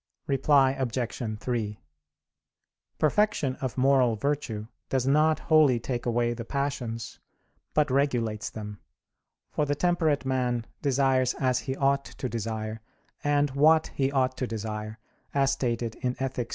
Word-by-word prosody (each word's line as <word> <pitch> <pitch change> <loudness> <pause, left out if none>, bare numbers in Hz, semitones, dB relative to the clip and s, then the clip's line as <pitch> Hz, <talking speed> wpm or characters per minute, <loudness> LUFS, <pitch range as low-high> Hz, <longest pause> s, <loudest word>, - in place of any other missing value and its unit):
Reply 135 0 +4
Obj. 130 -3 -3 0.2
3: 110 -4 -2 1.2
Perfection 155 -5 +2
of 130 -2 -4
moral 130 -3 +4
virtue 115 -4 -2 0.2
does 130 -2 0
not 155 +3 +4
wholly 150 -6 +4
take 120 +1 -3
away 120 0 +1
the 115 0 -6
passions, 120 -4 -3 0.6
but 150 -2 +3
regulates 120 -6 0
them; 105 -2 -7 0.7
for 150 - 0
the 145 - +1
temperate 160 -3 +1
man 125 -3 0 0.2
desires 130 -2 +2
as 130 -2 +1
he 130 0 -4
ought 140 0 +1
to 130 - -5
desire, 110 -1 -4 0.4
and 145 -1 +2
what 155 +4 +4
he 135 0 0
ought 130 -2 +1
to 130 - -2
desire, 110 -1 -5 0.4
as 135 -1 +3
stated 120 -4 -1
in 125 0 -2
_Ethic. 130 -2 -3
130 Hz, 135 wpm, -27 LUFS, 115-140 Hz, 1.2 s, Reply